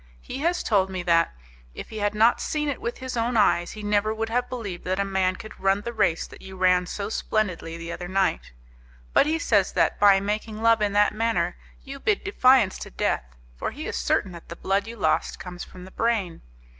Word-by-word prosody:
He 265 - -6
has 345 +4 0
told 195 -4 +2
me 185 -2 -4
that, 170 -1 +3 0.4
if - - -8
he 220 - -6
had 205 0 0
not 225 +3 +4
seen 300 -1 -1
it 280 - -4
with 235 - -3
his 260 -1 -5
own 235 +1 0
eyes, 175 -4 +3
he 215 - -8
never 205 +1 +1
would 225 0 -2
have 245 +2 0
believed 210 -8 -5
that 185 +1 -1
a 200 - +1
man 190 -1 +1
could 215 - -11
run 195 +1 +2
the 235 +3 -5
race 195 -7 +1
that - - -14
you 190 0 -10
ran 180 -1 +3
so 200 +2 -4
splendidly 185 -7 -2
the 165 0 -6
other 175 - -5
night, 190 -2 0 0.6
but 285 - +5
he 315 +1 +1
says 205 - +2
that, - - +1
by 200 -1 +6
making 215 +2 -3
love 230 -1 +4
in 205 -1 +1
that 205 0 +4
manner, 210 -6 0 0.3
you 275 0 -8
bid 420 +7 0
defiance 255 - +4
to - - -7
death, - - -2 0.2
for - - -3
he - - -7
is - - -4
certain 65 - 0
that 170 -1 -12
the 170 - -6
blood 195 +3 0
you 230 - -7
lost 155 -6 0
comes 180 -1 -7
from 180 -1 -12
the 190 - -13
brain. 215 -8 -1
205 Hz, 225 wpm, -25 LUFS, 185-230 Hz, 0.6 s, by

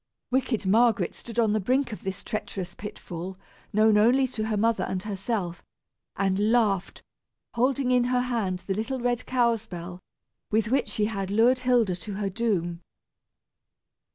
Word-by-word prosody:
Wicked 255 -5 0
Margaret 215 -2 +3
stood 230 -1 -9
on 225 -3 +3
the 215 - +2
brink 255 +5 +1
of 210 - -7
this 190 0 -5
treacherous 190 -5 -4
pit 210 - -8
fall, 180 +2 -7 0.3
known 215 0 +4
only 250 +5 +5
to 220 -3 -3
her 215 -1 0
mother 225 +2 +2
and 185 0 -3
herself, 195 -4 -3 0.5
and 195 +2 +1
laughed, 210 -6 +1 0.5
holding 255 +2 +1
in 250 -1 +4
her 250 0 +2
hand 215 -8 -2
the 195 - -1
little 225 +6 -2
red 245 0 0
cow's 235 -3 +1
bell, 175 0 -7 0.5
with 220 0 +1
which 265 +2 +1
she 210 - 0
had 195 -3 -3
lured 235 +5 +4
Hilda 245 -7 +2
to 205 +3 -7
her 200 -1 -2
doom. 185 -6 -1
215 Hz, 160 wpm, -26 LUFS, 195-240 Hz, 0.5 s, only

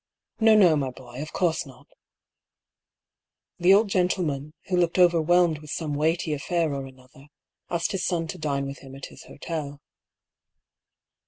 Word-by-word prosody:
" - - -65
No, 220 -1 +6
no, 180 -7 +6
my 140 -3 -1
boy; 125 +1 -10
of 155 - -7
course 170 -3 0
not" 135 -4 -15 1.7
The 180 +2 +5
old 215 +2 +3
gentleman, 170 -6 -1
who 185 - -1
looked 175 0 +1
overwhelmed 175 -2 +4
with 150 -1 -13
some 155 -1 -3
weighty 160 +2 0
affair 160 +1 -1
or 135 -1 -4
another, 130 +1 -17 0.4
asked 170 -1 -1
his 195 - -2
son 170 -2 0
to 180 - -6
dine 140 -3 -1
with 140 0 -7
him 135 -1 -12
at 135 - -8
his - - -13
hotel. 145 -2 -6
160 Hz, 160 wpm, -25 LUFS, 140-175 Hz, 1.7 s, No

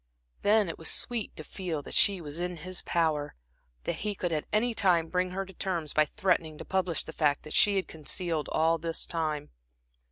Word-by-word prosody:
Then 210 -1 +4
it 165 - -5
was 160 - -1
sweet 235 -3 -2
to - - -5
feel 170 -6 -4
that - - -9
she 195 -3 +5
was 150 +1 -6
in 180 0 -2
his 180 +3 -4
power, 155 -3 0 0.5
that - - -2
he 210 0 -2
could 175 -2 -2
at 155 -2 -1
any 230 +3 +3
time 180 -6 +4
bring 180 +2 0
her 195 +2 -3
to 190 - -13
terms 170 -6 -2
by 155 - +5
threatening 165 -3 0
to - - -8
publish 185 -3 0
the - - -9
fact 145 -3 +1
that 155 - -8
she 205 -1 +5
had 190 - 0
concealed 160 0 -2
all 165 +1 +3
this 165 0 0
time. 155 -3 -2
170 Hz, 210 wpm, -29 LUFS, 155-190 Hz, 0.5 s, she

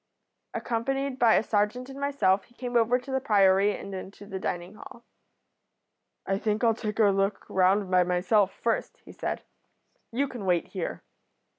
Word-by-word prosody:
Accompanied 270 +3 -2
by 230 -2 +5
a - - +3
serjeant 215 +4 0
and 270 0 -9
myself 240 -9 +2
he 240 - -26
came 245 -1 -5
over 235 +1 +4
to 255 +2 -9
the 265 - +1
Priory 200 -3 +4
and 200 - -8
into 195 +2 -8
the 195 -2 -6
dining 175 +1 -4
hall. 240 +1 -13 1.2
"'I 195 0 0
think 215 +2 -1
I'll 230 -1 +5
take 215 -1 -4
a 225 - +4
look 195 +1 0
round 190 +1 +2
by 180 0 +5
myself 185 +3 +2
first,' 230 -1 -2
he - - -11
said. - - -4 0.7
'You 275 +5 0
can 240 -7 -7
wait 175 -2 +1
here.' 185 -4 -5
210 Hz, 170 wpm, -27 LUFS, 195-245 Hz, 1.2 s, by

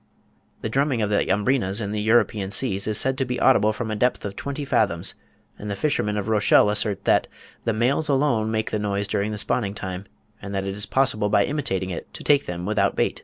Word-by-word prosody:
The 110 - -3
drumming 135 -1 +1
of 105 - -1
the 100 - +1
Umbrinas 105 0 +1
in 100 -2 -3
the 105 0 -2
European 110 -3 +2
seas 100 -2 0
is 105 -1 +2
said 130 0 +2
to - - +2
be 125 -1 -3
audible 110 -5 +4
from 110 0 -4
a - - -1
depth 125 +1 0
of 100 - -5
twenty 140 +1 -5
fathoms; 100 -10 +1 0.5
and 105 - -6
the 100 - -2
fishermen 105 -7 -1
of 105 0 -3
Rochelle 105 -1 +4
assert 105 -1 -1
"that - - +3 0.4
the 115 - +1
males 130 +8 +1
alone 135 -6 +1
make 110 0 -2
the 105 - -1
noise 100 -1 -1
during 100 +1 -1
the 105 - -4
spawning 105 -1 -1
time; 95 -1 -6 0.3
and 100 0 -6
that 95 0 -2
it 95 - -3
is 105 +1 -3
possible 110 -5 +1
by 100 -1 +3
imitating 95 -11 -2
it, 85 - -7
to - - -7
take 145 -1 +3
them 90 0 -5
without 100 -1 +1
bait." - - 0
105 Hz, 225 wpm, -23 LUFS, 100-125 Hz, 0.5 s, audible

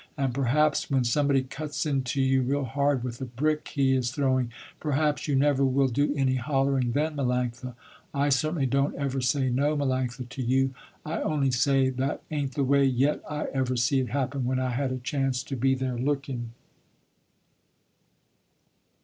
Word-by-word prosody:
And 135 -3 0
perhaps 140 +4 +1
when 135 -2 +2
somebody 135 +2 +2
cuts 150 +4 -4
into 135 -2 0
you 130 0 +3
real 140 +3 0
hard, 140 +1 0
with 120 0 -5
a - - -2
brick 150 +5 -1
he 135 -2 +1
is 125 -2 0
throwing, 130 -3 0 0.3
perhaps 150 0 0
you 145 - +1
never 140 0 +3
will 135 0 +3
do 145 +4 +1
any 130 -2 +1
hollering 135 -2 +1
then, 150 +2 0
Melanctha. 125 -2 -2 0.4
I 140 +1 +1
certainly 150 +2 +1
don't 140 +2 +1
ever 135 -1 -2
say 130 +1 +1
no, 145 +4 +1
Melanctha, 130 -3 -1
to 130 +2 -6
you, 130 +2 +1 0.3
I 155 +2 -3
only 140 -4 +1
say 130 +2 +2
that 130 +2 -2
ain't 140 -4 -2
the 140 - +1
way 140 +1 +3
yet 135 +2 +2
I 150 -1 -3
ever 130 -1 0
see 125 +3 +2
it 130 - -2
happen 135 0 -1
when 130 +1 0
I 130 -1 -1
had 130 +2 -1
a 130 - -2
chance 130 -1 -1
to 135 - -5
be 135 +2 +2
there 130 -2 -3
looking." 135 -3 -2
135 Hz, 175 wpm, -27 LUFS, 130-140 Hz, 0.4 s, you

